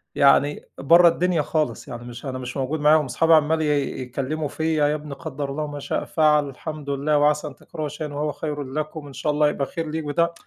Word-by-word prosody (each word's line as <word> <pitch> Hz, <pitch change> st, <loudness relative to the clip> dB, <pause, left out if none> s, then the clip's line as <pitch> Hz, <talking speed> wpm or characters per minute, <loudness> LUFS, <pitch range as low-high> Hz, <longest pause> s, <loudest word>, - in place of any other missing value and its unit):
يعني 140 Hz, +1 st, +4 dB
برّه 170 Hz, +5 st, +6 dB
الدنيا 170 Hz, 0 st, +2 dB
خالص، 155 Hz, +1 st, -2 dB
يعني 120 Hz, 0 st, -7 dB
مش 120 Hz, +1 st, -9 dB
أنا 130 Hz, -1 st, -4 dB
مش 125 Hz, +2 st, -6 dB
موجود 135 Hz, +4 st, -2 dB
معاهم. 150 Hz, +1 st, +4 dB
أصحابي 160 Hz, +6 st, +2 dB
عمّال 160 Hz, +1 st, +4 dB
ي 145 Hz, -4 st, 0 dB
يتكلموا 135 Hz, +5 st, -3 dB
في 160 Hz, +3 st, -1 dB
يا 150 Hz, 0 st, +2 dB
ابني 150 Hz, -1 st, -7 dB
قدَّر 145 Hz, -2 st, -5 dB
الله 155 Hz, +2 st, -3 dB
وما 145 Hz, -1 st, -5 dB
شاء -, -, -2 dB
فعل. 150 Hz, -2 st, +3 dB
الحمد 150 Hz, +1 st, -7 dB
لله 145 Hz, +2 st, +1 dB
وعسى 150 Hz, +1 st, +2 dB
أن 140 Hz, -, -9 dB
تكرهوا 155 Hz, +1 st, -6 dB
شيئًا 150 Hz, 0 st, -6 dB
وهو 150 Hz, +1 st, -1 dB
خيرٌ 145 Hz, 0 st, -4 dB
لكم، 150 Hz, +2 st, -5 dB
إن 140 Hz, -, -11 dB
شاء 150 Hz, -, -1 dB
الله 150 Hz, 0 st, +3 dB
هيبقى 140 Hz, -2 st, -1 dB
خير 165 Hz, 0 st, -5 dB
ليك 160 Hz, 0 st, -3 dB
بتاع 170 Hz, +3 st, +1 dB
150 Hz, 220 wpm, -23 LUFS, 140-155 Hz, -, برّه